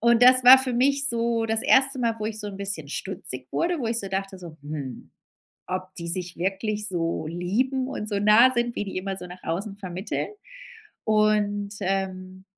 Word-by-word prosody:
und 235 +1 +4
das 255 0 +7
war 260 +2 +11
für 260 -1 0
mich 275 +3 +2
so 230 -2 0
das 225 0 0
1. 270 0 +4
Mal 230 -2 0
wo 215 - -3
ich 220 0 -4
so 210 - -6
'n 195 - -8
bisschen 195 -7 -4
stutzig 140 -7 -5
wurde 345 -1 0
wo 235 - -2
ich 230 +1 0
so 195 - -6
dachte 195 0 -4
so: 170 -3 -11
„Hm 145 -4 -7 0.6
ob 185 0 -5
die 170 -2 -5
sich 175 0 -1
wirklich 205 +4 -2
so 165 -3 -2
lieben 240 +11 -1
und 210 -5 -5
so 205 - -1
nah 215 +5 +6
sind 240 0 -1
wie - - -2
die 195 -2 -6
immer 195 +1 -3
so 180 - -8
nach 180 +1 -11
außen 195 +5 -4
vermitteln?“ 185 0 -4 0.8
Und, 210 -1 +1
ähm, 185 -1 -3
205 Hz, 195 wpm, -25 LUFS, 185-235 Hz, 0.8 s, war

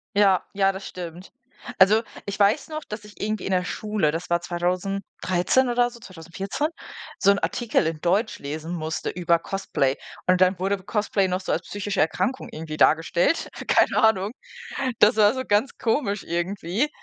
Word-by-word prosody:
Ja 195 -2 +4
ja, 195 -1 +3
das 190 +1 -7
stimmt. 175 +1 -8 0.5
Also, 205 +4 +6 0.2
ich 200 0 -5
weiß 205 +9 +3
noch, 310 -1 -5
dass 210 0 -7
ich 210 0 -13
irgendwie 215 -1 -2
in - - -2
der 180 -1 +2
Schule, 210 -4 -1
das 165 +3 -5
war 170 0 +2
2013 185 +5 0
oder 245 0 +2
so, 235 - -13
2014, 190 - -4 0.5
so 200 - +5
'n 200 - +2
Artikel 235 -8 0
in 160 -1 -3
Deutsch 195 +6 +1
lesen 155 +4 -5
musste 160 -1 -3
über 170 -1 +2
Cosplay. 150 -8 -1 0.3
Und 185 0 +3
dann 185 0 +4
wurde 195 +2 0
Cosplay 205 -1 0
noch 185 0 -1
so 190 - -4
als 165 - 0
psychische 200 +3 -2
Erkrankung 250 +11 -1
irgendwie 155 -1 -6
dargestellt, 165 - +3 0.2
keine - - +3
Ahnung. 205 -2 +3 0.7
Das 215 +2 +5
war 210 0 +6
so 260 - -2
ganz 210 +5 +1
komisch 225 -4 0
irgendwie. 180 - -1
195 Hz, 170 wpm, -24 LUFS, 175-210 Hz, 0.7 s, Also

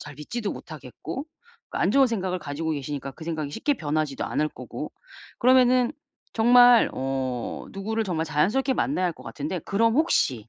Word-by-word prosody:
잘 - - -9
믿지도 205 +9 -4
못하겠고 275 - -8 0.5
그 - - -4
안 - - +2
좋은 275 -1 +5
생각을 190 -5 -2
가지고 155 +1 -4
계시니까 140 -1 -4
그 160 - -11
생각이 155 -3 -3
쉽게 280 - 0
변하지도 155 - -2
않을 155 - 0
거고 - - -7 0.5
그러면은 255 +1 +4 0.4
정말 245 +1 +7
어 130 -2 -3
누구를 220 +3 -2
정말 165 -5 -1
자연스럽게 205 - +1
만나야 225 -9 0
할 175 - -1
것 - - -14
같은데 155 +5 -4
그럼 225 +6 +1
혹시 130 - +1
180 Hz, 370 characters per minute, -25 LUFS, 150-240 Hz, 0.5 s, 정말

